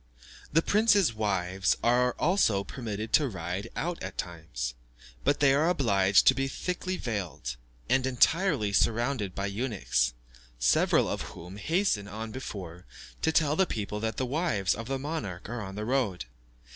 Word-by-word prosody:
The 165 +3 +3
prince's 205 - +4
wives 95 -3 0
are 125 +1 +3
also 150 - +2
permitted 110 0 -5
to 145 -4 +4
ride 90 0 -4
out 175 +1 -3
at - - -6
times, 80 -9 -4 0.5
but 145 - +2
they 140 -2 +6
are 155 +5 +3
obliged 100 - +3
to - - +7
be 135 0 -1
thickly 180 +5 -3
veiled, 95 - -4 0.3
and 130 0 +2
entirely 130 - +2
surrounded 115 -2 +1
by 100 - -2
eunuchs, 100 - 0 0.4
several - - +3
of - - -2 0.2
whom 90 +4 -9
hasten 155 - 0
on 110 +1 -6
before, 95 -8 -7 0.3
to 160 - +2
tell 155 -2 +3
the 190 +2 +3
people 105 -1 -3
that 110 +1 -2
the 130 - 0
wives 125 - 0
of 115 +1 -6
the 135 0 -1
monarch 135 - -5
are 120 +1 -4
on 95 -1 -7
the 105 +1 -4
road. 115 - 0
110 Hz, 160 wpm, -29 LUFS, 95-140 Hz, 0.5 s, to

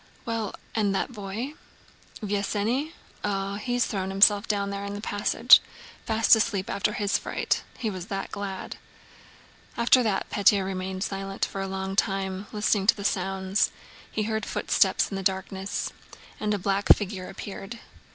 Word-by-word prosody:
"Well, 230 -3 -2 0.2
and 205 -3 +1
that 195 - -1
boy?" 215 +5 -5 0.7
"Vesénny? 210 +8 -1 0.3
Oh, 200 -1 -1
he's 245 +1 +1
thrown 190 -3 -3
himself 200 +1 +5
down 200 -1 0
there 200 0 -4
in 200 0 -4
the - - -5
passage. 205 -1 +5 0.5
Fast 225 0 +5
asleep 210 -3 0
after 205 +1 0
his 205 -1 0
fright. - - -1 0.2
He 230 - -3
was 185 -1 -6
that 195 -2 -4
glad!" 195 -2 -5 1.0
After 235 +2 +5
that 210 -5 0
Pétya 200 -1 +4
remained 190 0 -3
silent 195 -1 -2
for 195 - -5
a 195 - -2
long 190 0 -3
time, 195 0 -1
listening 210 -2 +1
to - - +6
the 200 - -6
sounds. 190 +1 +1 0.4
He 215 - -1
heard 220 0 -2
footsteps - - +2
in 195 - -3
the - - -3
darkness 190 +1 -2 0.5
and 210 0 0
a - - -1
black 200 +1 -1
figure 190 -3 -5
appeared. 200 +3 -7
200 Hz, 155 wpm, -26 LUFS, 195-210 Hz, 1.0 s, to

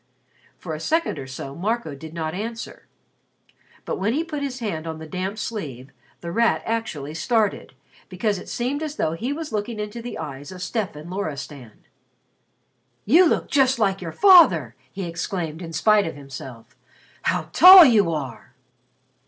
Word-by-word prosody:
For 165 - -7
a 155 - -5
second 325 - -1
or 130 - -7
so 135 +1 -7
Marco 210 0 -2
did 155 +3 -10
not 160 -1 -4
answer. 225 +4 -7 1.0
But - - -3
when 205 +4 0
he 310 +5 0
put 305 -3 -5
his 275 -2 -4
hand 170 -10 -4
on 160 -1 -5
the 160 - -9
damp 185 +6 -4
sleeve, 145 - -6 0.3
The 170 - -5
Rat 230 +5 +1
actually 160 -11 -3
started, 215 - -1 0.3
because 200 +1 -1
it - - -11
seemed 260 +5 -2
as 305 -2 -4
though 155 - -1
he 230 +11 -3
were 320 +3 -4
looking 215 +1 -3
into 210 +2 -5
the 240 +1 -7
eyes 145 -1 -7
of 180 -1 -7
Stefan 175 -8 -4
Loristan. 145 - -7 1.2
"You 335 - +6
look - - 0
just 265 -3 +3
like 195 -4 0
your 165 -3 -5
father!" 200 - +6 0.2
he 195 - -6
exclaimed, 170 -1 -4
in 165 -2 -7
spite 210 +3 +3
of 160 - -6
himself. 130 -4 -11 0.5
"How - - -1
tall 365 -1 +11
you 210 - +4
are!" 135 -5 -6
190 Hz, 165 wpm, -23 LUFS, 155-235 Hz, 1.2 s, tall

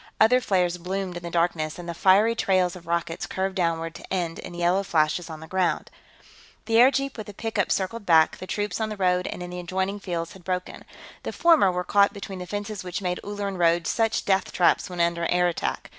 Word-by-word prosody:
Other 250 +4 +5
flares 180 -5 +1
bloomed 185 +1 -3
in 175 - -5
the 170 - -6
darkness, 165 -2 0
and 175 -1 -8
the 170 - -3
fiery 195 +6 +4
trails 185 -5 +1
of 175 -2 -12
rockets 170 0 -2
curved 190 0 -2
downward 165 -3 -1
to - - -12
end 175 -3 -2
in 175 - -8
yellow 175 +3 +2
flashes 165 -2 0
on 160 -1 -8
the 160 - -9
ground. 180 -4 -1 0.7
The 225 -1 +2
airjeep 275 +2 +3
with 215 - -7
the 205 - -10
pickup 220 -2 -1
circled 205 +4 -1
back; 160 -4 +4
the 185 - -8
troops 205 +4 -2
on 220 - -1
the 215 - -6
road 180 -1 +1
and 180 - -5
in 175 - -7
the 180 - -5
adjoining 190 +3 -2
fields 170 -4 -4
had 190 - -15
broken. 180 0 -4 0.4
The - - -4
former 325 - +4
were 180 0 -2
caught 200 +1 +3
between 195 -2 -7
the 180 - -7
fences 205 0 -5
which 180 +2 -5
made 180 -1 -1
Ulleran 200 -2 -4
roads 170 -1 +2
such 225 -1 0
death 190 -1 +1
traps 180 - +2
when 180 -1 -7
under 170 0 +1
air 180 0 +3
attack. 175 - -3
185 Hz, 220 wpm, -25 LUFS, 170-200 Hz, 0.7 s, Other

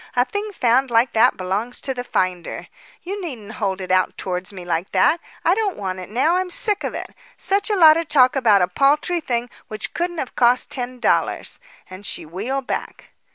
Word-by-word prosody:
A 245 0 +3
thing 415 +6 -4
found 260 - +2
like 235 +1 +2
that 235 +3 +4
belongs 200 +6 -3
to 265 - -2
the 245 -1 -5
finder. 185 -7 -2 0.3
You 395 +3 -5
needn't 240 - -7
hold 195 -2 -1
it 185 -1 -5
out 185 0 +2
towards 180 0 -3
me 185 -3 -9
like 170 +1 -2
that. 200 - +3 0.3
I 345 - +5
don't 410 -2 -1
want 185 -2 -4
it 185 - -8
now; 285 - +2
I'm 370 0 -1
sick 410 +3 +2
of - - -3
it. - - -6 0.2
Such 400 +2 +1
a 420 - +2
lot 320 -4 +7
of 330 -2 -2
talk 255 -3 +4
about 215 -8 +4
a - - +2
paltry 295 - +1
thing 240 -4 -2 0.2
which 215 0 -4
couldn't 345 0 -2
have 265 - -5
cost 245 0 +3
ten 250 -1 -4
dollars." - - 0 0.3
And 185 +2 -11
she - - -4
wheeled 230 - -4
back. - - -5
245 Hz, 205 wpm, -21 LUFS, 195-325 Hz, 0.3 s, lot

